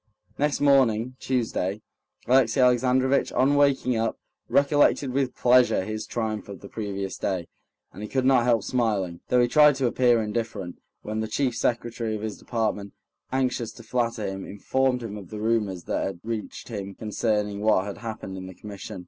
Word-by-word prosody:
Next 145 0 +1
morning, 130 -4 +3
Tuesday, 110 -5 -1 0.4
Alexey 125 -1 +3
Alexandrovitch, 130 +2 +3
on 130 +3 +3
waking 140 -3 +3
up, 115 0 -1 0.3
recollected 140 -1 +3
with 130 -1 -1
pleasure 125 -6 +4
his 110 +1 -5
triumph 110 -3 -3
of 100 - -9
the 100 - -9
previous 100 -2 -5
day, 90 -3 -2 0.5
and 100 - -10
he 105 - -6
could 130 -1 0
not 130 -3 +4
help 115 -4 +3
smiling, 105 -9 -1
though 125 - +3
he 120 - +4
tried 150 +2 +6
to 135 -1 -1
appear 120 -1 +3
indifferent, 105 -4 -4 0.2
when 110 +1 -3
the 110 - -2
chief 125 +2 0
secretary 115 -2 -1
of 105 - -6
his 110 -2 -5
department, 105 -4 -2 0.4
anxious 125 -3 -1
to 115 - -13
flatter 115 -2 -1
him, 95 0 -4
informed 125 +4 -1
him 105 -2 -6
of 95 -4 -10
the 105 - -7
rumors 105 -5 0
that - - -2
had 95 -3 -4
reached 110 +1 -5
him 100 -3 -6
concerning 105 -2 -1
what 105 -3 +3
had 100 - -6
happened 110 -4 -6
in 95 0 -7
the 95 - -10
Commission. 100 -1 -8
115 Hz, 175 wpm, -25 LUFS, 105-125 Hz, 0.5 s, tried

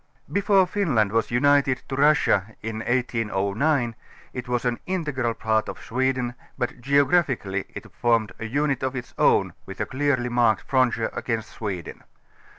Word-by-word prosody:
Before 200 -1 +4
Finland 150 - +1
was 115 +1 +1
united 140 +1 +3
to 135 - -4
Russia 135 -8 +3
in 110 0 -4
1809 120 +2 0 0.4
it 125 0 -6
was 125 0 -1
an 120 -1 0
integral 150 -10 -1
part 110 -1 0
of - - -6
Sweden, 130 0 -1 0.2
but 125 0 -3
geographicall3^ 135 - +2
it - - -9
formed 115 -3 +1
a 115 - -4
unit 140 +4 0
of 130 0 -2
its 125 -1 -6
own - - +3
with 95 +1 -9
a - - 0
clearly 130 -2 0
marked 120 -3 +2
frontier 125 -4 +1
against 115 -2 -3
Sweden. 95 -7 -5
125 Hz, 150 wpm, -24 LUFS, 115-140 Hz, 0.4 s, Before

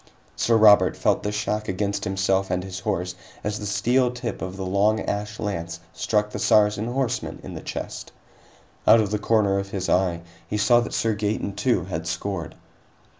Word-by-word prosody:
Sir 115 -1 +3
Robert 105 -2 +6
felt - - +2
the 105 - -2
shock 105 0 -2
against 100 +2 -2
himself 95 0 +1
and 90 0 -1
his 95 -1 -6
horse 90 -2 -2 0.3
as 105 0 -2
the 105 - -4
steel 125 +6 +2
tip 125 -3 -5
of 95 +1 -5
the 95 - -4
long 100 +4 +2
ash 105 +1 -3
lance 85 -5 -4
struck 105 -1 0
the - - -5
Saracen 105 +1 +3
horseman 130 0 -2
in - - -8
the - - -7
chest. - - -6 0.8
Out 115 - +8
of 105 -2 0
the 105 - 0
corner 105 -3 +2
of 100 0 -5
his 95 -1 -3
eye, 90 -2 +2 0.3
he 105 - -2
saw 110 +3 +5
that 120 - -3
Sir 115 -1 +1
Gaeton, 105 -1 -2
too, 115 +4 +1
had 85 -2 -4
scored. 95 -3 -4
105 Hz, 185 wpm, -24 LUFS, 95-110 Hz, 0.8 s, Out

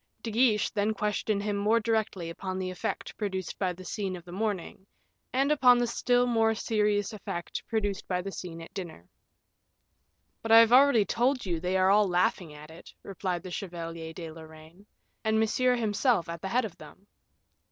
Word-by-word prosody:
De 230 - -4
Guiche 220 -2 +2
then 210 +1 0
questioned 210 -1 -1
him 205 -1 -1
more 210 +3 +2
directly 215 -6 -1
upon 185 +2 -5
the 185 -1 -3
effect 180 - -4
produced 190 -4 -4
by 185 -2 +1
the 185 +1 -10
scene 190 +1 -3
of 175 - -11
the 175 - -11
morning, 195 -1 -4 0.4
and 270 +3 +1
upon 255 -4 +6
the 240 - +2
still 245 +1 +2
more 225 -2 +2
serious 210 -2 0
effect 175 -4 -5
produced 205 -3 -2
by 180 -1 0
the 195 +2 -5
scene 165 -3 -7
at - - -13
dinner. 170 - -8 1.3
"But 225 0 +1
I - - +10
have 230 +1 +7
already 255 -5 +6
told 250 +3 0
you 170 -3 -1
they 180 +3 0
are 190 +1 +4
all 205 0 +5
laughing 180 -2 0
at 150 +1 -12
it," 165 - -13
replied 185 -3 -4
the 185 - -8
Chevalier 165 -3 -6
de 165 -1 -8
Lorraine, 160 +4 -14 0.4
"and 220 0 +2
Monsieur 250 +3 +2
himself 220 -3 +1
at 170 0 -6
the 195 - -4
head 245 +3 +1
of 205 - -8
them." 155 +6 -14
200 Hz, 185 wpm, -28 LUFS, 175-225 Hz, 1.3 s, I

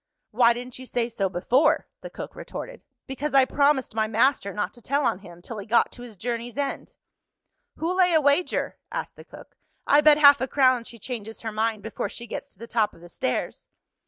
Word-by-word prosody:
"Why 235 +1 +5
didn't 245 +1 -8
you 260 - -9
say 240 -1 -1
so 200 -4 -1
before?" 255 - +2
the - - -8
cook - - -8
retorted. - - -8 0.2
"Because 275 +2 -4
I 270 -1 +7
promised 280 -2 +1
my 220 -1 0
master 225 -1 +2
not 205 +1 -3
to 240 - -15
tell 280 +4 0
on 180 - +1
him, 175 -3 -14
till 220 +1 -7
he 200 - -8
got 235 +2 +3
to 245 - -12
his 235 -4 -10
journey's 235 +3 -4
end." 285 -1 -4 0.8
"Who'll 345 +3 -2
lay 365 -1 +4
a - - +6
wager?" 285 +4 +1
asked - - -5
the - - -12
cook. - - -14 0.3
"I 290 - +5
bet 300 0 +6
half 285 -1 +7
a 260 - 0
crown 255 -3 +3
she 235 - -11
changes 225 -1 -7
her 225 - -4
mind, 215 -1 -1
before 225 - -4
she 235 - -8
gets 230 - -6
to - - -20
the 230 - -9
top 220 -2 0
of - - -18
the 175 - -13
stairs." 125 - -3
240 Hz, 215 wpm, -25 LUFS, 220-280 Hz, 0.8 s, I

